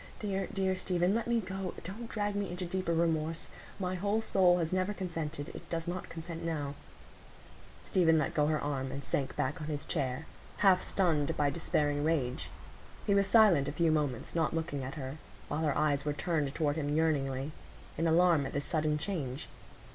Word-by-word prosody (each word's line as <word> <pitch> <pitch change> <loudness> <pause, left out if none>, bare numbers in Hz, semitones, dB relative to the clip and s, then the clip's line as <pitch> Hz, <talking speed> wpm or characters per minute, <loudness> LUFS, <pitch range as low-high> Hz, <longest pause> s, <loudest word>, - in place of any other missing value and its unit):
Dear, 195 -2 -2
dear 190 -1 +1
Stephen, 180 0 +1
let 230 +1 0
me 235 -1 +2
go!—don't 190 +3 -6
drag 205 -1 -1
me 205 -1 -1
into 180 +1 -4
deeper 185 0 -1
remorse. 165 -1 0 0.3
My 185 -1 -1
whole 200 +4 +1
soul 185 -5 +4
has 165 0 -1
never 185 +2 0
consented; 165 -5 -4
it - - -10
does 165 0 -2
not 180 +1 -4
consent 165 0 -6
now." 150 -4 -2 1.1
Stephen 165 -3 +4
let 155 - 0
go 150 -1 +3
her 155 0 +1
arm, 135 -2 -2
and 140 +1 -5
sank 135 - -1
back 145 +4 -1
on 150 - -4
his 150 -1 -3
chair, 140 -1 -1 0.3
half 190 -3 +5
stunned 160 -7 +1
by 145 -1 +2
despairing 145 -2 0
rage. 145 -4 0 0.6
He 200 - +3
was 200 0 +4
silent 200 -10 +6
a - - -1
few 170 -2 +2
moments, 145 -6 -1
not 165 -1 +1
looking 160 -4 -2
at 135 +4 -5
her; 135 -1 -5 0.3
while 155 - -1
her 150 -3 +1
eyes 145 -2 +2
were 150 - 0
turned 150 -3 -1
toward 150 -1 +1
him 145 -1 0
yearningly, 140 -3 +1 0.4
in 165 - +1
alarm 165 -3 +4
at - - -8
this 145 0 -1
sudden 155 -2 +1
change. 150 -6 -3
160 Hz, 185 wpm, -32 LUFS, 145-185 Hz, 1.1 s, silent